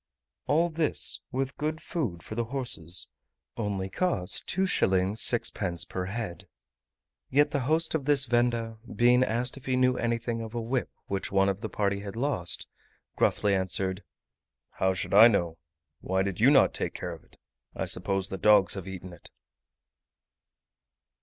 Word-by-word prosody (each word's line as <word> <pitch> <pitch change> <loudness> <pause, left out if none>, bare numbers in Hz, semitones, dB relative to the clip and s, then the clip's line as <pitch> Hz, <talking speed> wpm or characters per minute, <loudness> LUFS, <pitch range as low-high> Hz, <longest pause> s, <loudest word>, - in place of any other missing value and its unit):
All 165 +5 +3
this, 155 -1 +1
with 135 +1 -3
good 155 +1 -2
food 115 - -4
for - - -8
the 120 +1 -1
horses, 115 - -1 0.4
only 100 -4 -2
cost 95 - -1
2s. 190 0 +2 0.3
6d. 100 -6 0
per 90 -1 -3
head. 95 -2 -5 0.8
Yet 145 +2 +3
the 140 - 0
host 160 +1 +2
of 155 -4 -1
this 140 -2 +4
venda, 120 -2 0 0.2
being 125 +1 +5
asked 125 +2 -1
if 135 - -13
he 130 - +1
knew 125 0 +3
anything 115 0 -1
of 110 +1 -7
a - - -1
whip 120 +3 -2 0.2
which 95 -1 -3
one 95 0 +3
of 100 +1 -3
the 110 - -4
party 100 -1 -1
had 100 0 -7
lost, 115 -9 0 0.5
gruffly 105 -1 +2
answered, 95 0 -1 0.7
"How 95 0 0
should 95 - -3
I 110 +3 +10
know? 85 -7 0 0.4
why 95 +1 0
did 95 -2 -4
you 120 +5 +6
not 140 -2 +5
take - - -2
care - - -5
of - - -12
it? - - -20 0.4
I - - -2
suppose 95 -1 -1
the 95 - -5
dogs 105 -3 +5
have 95 -2 -6
eaten 95 -1 -8
it." 85 - -12
115 Hz, 160 wpm, -28 LUFS, 95-130 Hz, 0.8 s, I